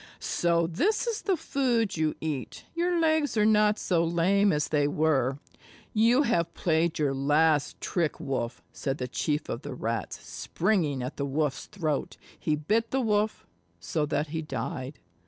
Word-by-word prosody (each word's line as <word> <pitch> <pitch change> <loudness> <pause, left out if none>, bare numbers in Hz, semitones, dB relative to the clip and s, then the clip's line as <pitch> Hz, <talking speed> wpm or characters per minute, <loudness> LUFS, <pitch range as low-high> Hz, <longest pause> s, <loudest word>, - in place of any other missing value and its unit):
"So 170 -1 +1
this 365 - +1
is 460 -2 -2
the 385 -3 +1
food 255 -8 0
you 155 -1 0
eat. 150 -5 -4
Your 345 +1 +1
legs 315 -5 +2
are 210 - +4
not 210 0 +4
so 170 -3 +1
lame 185 +5 +3
as 150 -1 0
they 145 -2 +2
were. 145 -3 +1 0.6
You 235 +6 +4
have 170 - 0
played 165 -1 +1
your 145 -3 +1
last 145 +2 +2
trick, 165 -5 -1
Wolf," 125 -3 -3
said 135 0 -2
the 125 - -3
Chief 150 +4 -1
of 115 - -4
the - - -6
Rats, 115 -1 -3
springing 165 -9 0
at 125 - -5
the 140 - -1
Wolf's 145 0 -1
throat. 155 -7 -2 0.2
He 155 - +1
bit 215 +10 0
the 270 - 0
Wolf, 215 -3 0 0.3
so 150 - -1
that 145 0 -1
he 160 +1 -3
died. 130 -1 -5
160 Hz, 165 wpm, -28 LUFS, 145-215 Hz, 0.6 s, are